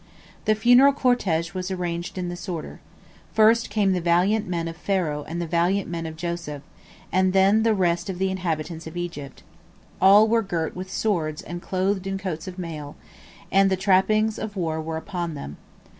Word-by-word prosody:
The 215 Hz, -, +3 dB
funeral 245 Hz, +5 st, +6 dB
cortege 190 Hz, -, +1 dB
was 185 Hz, 0 st, -4 dB
arranged 175 Hz, -1 st, -4 dB
in 180 Hz, -1 st, -2 dB
this 175 Hz, +1 st, -6 dB
order: 165 Hz, -4 st, -5 dB, 0.6 s
First 225 Hz, +1 st, +4 dB
came 205 Hz, -2 st, +2 dB
the 180 Hz, -, -1 dB
valiant 180 Hz, +6 st, +2 dB
men 170 Hz, -2 st, -2 dB
of 165 Hz, -, -6 dB
Pharaoh 165 Hz, -5 st, -1 dB
and 170 Hz, +2 st, -4 dB
the 170 Hz, -, -2 dB
valiant 175 Hz, +4 st, +1 dB
men 165 Hz, -1 st, -4 dB
of 160 Hz, -, -7 dB
Joseph, 170 Hz, -4 st, -5 dB, 0.5 s
and 185 Hz, +1 st, +2 dB
then 195 Hz, +3 st, +4 dB
the 225 Hz, -1 st, +3 dB
rest 175 Hz, -1 st, 0 dB
of 185 Hz, -, -4 dB
the 190 Hz, +1 st, 0 dB
inhabitants 165 Hz, -3 st, -3 dB
of 160 Hz, +2 st, -8 dB
Egypt. 170 Hz, -6 st, -6 dB, 0.6 s
All 200 Hz, +3 st, +7 dB
were 230 Hz, +1 st, +3 dB
girt 170 Hz, -6 st, -3 dB
with 185 Hz, +1 st, -6 dB
swords 165 Hz, -9 st, -1 dB
and 175 Hz, 0 st, -7 dB
clothed 190 Hz, +1 st, -1 dB
in 195 Hz, 0 st, -2 dB
coats 180 Hz, -4 st, -5 dB
of 185 Hz, 0 st, -7 dB
mail, 155 Hz, -5 st, -6 dB, 0.6 s
and 195 Hz, 0 st, +5 dB
the 190 Hz, -, +1 dB
trappings 210 Hz, +3 st, +2 dB
of 215 Hz, -1 st, -5 dB
war 160 Hz, -4 st, -2 dB
were 160 Hz, 0 st, -4 dB
upon 170 Hz, -1 st, -4 dB
them. 75 Hz, -, -7 dB
180 Hz, 185 wpm, -24 LUFS, 165-195 Hz, 0.6 s, All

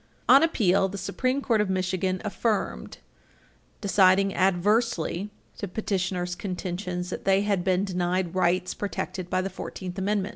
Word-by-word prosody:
On 270 Hz, +2 st, +8 dB
appeal, 195 Hz, -, +2 dB
the 200 Hz, -, -6 dB
Supreme 255 Hz, +8 st, -1 dB
Court 225 Hz, -4 st, +2 dB
of 210 Hz, -, -1 dB
Michigan 185 Hz, 0 st, -1 dB
affirmed, 210 Hz, +1 st, -2 dB, 0.8 s
deciding 195 Hz, -1 st, +4 dB
adversely 195 Hz, 0 st, +1 dB, 0.3 s
to 200 Hz, -, -3 dB
petitioners' 180 Hz, -2 st, -2 dB
contentions 180 Hz, -2 st, -4 dB
that -, -, -5 dB
they 195 Hz, 0 st, +4 dB
had 200 Hz, -3 st, 0 dB
been 185 Hz, +1 st, +1 dB
denied 180 Hz, -1 st, -1 dB
rights 185 Hz, 0 st, +1 dB
protected 185 Hz, -2 st, -4 dB
by 185 Hz, -, +1 dB
the 195 Hz, -, -2 dB
Fourteenth 185 Hz, 0 st, -6 dB
Amendment. 200 Hz, 0 st, 0 dB
190 Hz, 140 wpm, -26 LUFS, 180-205 Hz, 0.8 s, On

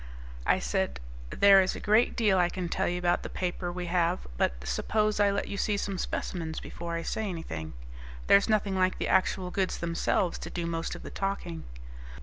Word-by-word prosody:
I -, -, +5 dB
said, 60 Hz, +1 st, -1 dB, 0.3 s
"There 195 Hz, -, +7 dB
is 185 Hz, -, 0 dB
a -, -, -6 dB
great 215 Hz, +3 st, +3 dB
deal 205 Hz, -5 st, +3 dB
I 175 Hz, -1 st, +3 dB
can 180 Hz, -1 st, -4 dB
tell -, -, 0 dB
you 175 Hz, -, -1 dB
about 175 Hz, 0 st, +1 dB
the -, -, -6 dB
paper 175 Hz, -1 st, -3 dB
we 180 Hz, 0 st, -4 dB
have, 175 Hz, 0 st, +1 dB
but -, -, +1 dB
suppose 210 Hz, -, 0 dB
I 205 Hz, -1 st, +5 dB
let 200 Hz, 0 st, -1 dB
you 200 Hz, -, -4 dB
see 205 Hz, +1 st, +1 dB
some 195 Hz, -2 st, -3 dB
specimens 165 Hz, -3 st, -3 dB
before 170 Hz, 0 st, -6 dB
I 165 Hz, -, -3 dB
say 220 Hz, +3 st, -2 dB
anything. 80 Hz, -, -6 dB, 0.5 s
There's 200 Hz, +3 st, +5 dB
nothing 205 Hz, -3 st, +2 dB
like 185 Hz, 0 st, +2 dB
the -, -, -2 dB
actual 185 Hz, -1 st, +1 dB
goods 190 Hz, -1 st, 0 dB
themselves 170 Hz, +1 st, 0 dB
to -, -, -6 dB
do 175 Hz, -, -3 dB
most 165 Hz, 0 st, -3 dB
of -, -, -10 dB
the -, -, -8 dB
talking." 140 Hz, -, -3 dB
180 Hz, 200 wpm, -29 LUFS, 170-200 Hz, 0.5 s, There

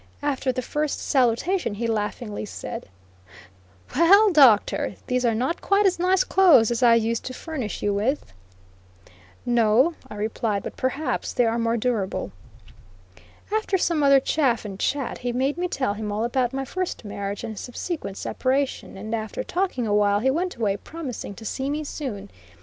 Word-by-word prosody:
After 275 Hz, -2 st, 0 dB
the 255 Hz, 0 st, -3 dB
first 300 Hz, +3 st, -2 dB
salutation, 260 Hz, -, +1 dB
he 235 Hz, +3 st, -3 dB
laughingly 210 Hz, -1 st, -3 dB
said: 205 Hz, -, -7 dB, 1.1 s
"Well, 395 Hz, +7 st, +6 dB
Doctor, 260 Hz, -9 st, +4 dB
those 250 Hz, -1 st, 0 dB
are 230 Hz, -2 st, +2 dB
not 260 Hz, +9 st, -1 dB
quite 400 Hz, +1 st, +3 dB
as 370 Hz, -2 st, +2 dB
nice 365 Hz, +1 st, +3 dB
clothes 330 Hz, -, +5 dB
as 235 Hz, -, -1 dB
I 235 Hz, -2 st, +6 dB
used 230 Hz, 0 st, 0 dB
to 255 Hz, -, -5 dB
furnish 270 Hz, -10 st, -5 dB
you 205 Hz, -, +1 dB
with." 205 Hz, -, -1 dB, 1.1 s
"No," 240 Hz, +6 st, +3 dB, 0.2 s
I -, -, -8 dB
replied, 210 Hz, -1 st, -2 dB
"but -, -, -6 dB
perhaps 275 Hz, +4 st, -2 dB
they 245 Hz, -, +3 dB
are 230 Hz, +1 st, 0 dB
more 230 Hz, 0 st, +1 dB
durable." 215 Hz, -, -1 dB, 1.2 s
After 430 Hz, -3 st, +1 dB
some 335 Hz, -3 st, +1 dB
other 275 Hz, -1 st, +6 dB
chaff 265 Hz, -5 st, +1 dB
and 195 Hz, -2 st, -7 dB
chat, 280 Hz, +3 st, -1 dB
he 245 Hz, 0 st, -2 dB
made 265 Hz, +4 st, 0 dB
me 360 Hz, -, 0 dB
tell 260 Hz, -, -1 dB
him 210 Hz, 0 st, -4 dB
all 210 Hz, +2 st, -1 dB
about 245 Hz, +1 st, 0 dB
my 270 Hz, 0 st, -3 dB
first 370 Hz, -6 st, -4 dB
marriage 200 Hz, 0 st, -5 dB
and 220 Hz, -, -5 dB
subsequent 245 Hz, -, -5 dB
separation, 265 Hz, -5 st, -2 dB
and 215 Hz, +3 st, -6 dB
after 220 Hz, -2 st, -3 dB
talking 355 Hz, -9 st, -1 dB
awhile 205 Hz, -1 st, +3 dB
he 265 Hz, +5 st, +2 dB
went 355 Hz, +5 st, -1 dB
away, 210 Hz, -4 st, 0 dB
promising 265 Hz, -8 st, -7 dB
to 220 Hz, -, -11 dB
see 265 Hz, +5 st, -3 dB
me 300 Hz, +2 st, -2 dB
soon. 220 Hz, -10 st, -6 dB
245 Hz, 165 wpm, -24 LUFS, 215-295 Hz, 1.2 s, Well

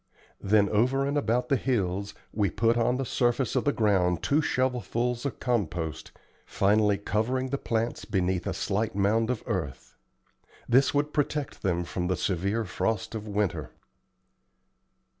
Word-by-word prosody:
Then 100 Hz, 0 st, +3 dB
over 130 Hz, +6 st, +2 dB
and 140 Hz, +1 st, -1 dB
about 125 Hz, -2 st, 0 dB
the 140 Hz, -, +4 dB
hills 100 Hz, -6 st, -1 dB, 0.2 s
we 100 Hz, -2 st, +1 dB
put 115 Hz, +6 st, +2 dB
on 120 Hz, +1 st, +2 dB
the 135 Hz, -, -2 dB
surface 120 Hz, +1 st, 0 dB
of -, -, +1 dB
the 145 Hz, -, +4 dB
ground 95 Hz, -, +1 dB
two 150 Hz, +2 st, +3 dB
shovelfuls 125 Hz, -2 st, -1 dB
of 140 Hz, -, -7 dB
compost, 90 Hz, -, -2 dB, 0.3 s
finally 105 Hz, 0 st, +2 dB
covering 120 Hz, +6 st, -1 dB
the 140 Hz, +1 st, -2 dB
plants 115 Hz, 0 st, -2 dB
beneath 95 Hz, -3 st, 0 dB
a -, -, -1 dB
slight 105 Hz, +1 st, -1 dB
mound 110 Hz, +3 st, +2 dB
of 125 Hz, -3 st, -2 dB
earth. 70 Hz, -, -4 dB, 0.7 s
This 130 Hz, +3 st, +4 dB
would 145 Hz, +1 st, 0 dB
protect 145 Hz, -4 st, -2 dB
them 90 Hz, -3 st, 0 dB
from 90 Hz, +1 st, -3 dB
the 95 Hz, -, 0 dB
severe 100 Hz, +5 st, -1 dB
frost 110 Hz, +4 st, -2 dB
of 110 Hz, -1 st, -5 dB
winter. 100 Hz, -8 st, -2 dB
110 Hz, 150 wpm, -27 LUFS, 95-125 Hz, 0.7 s, the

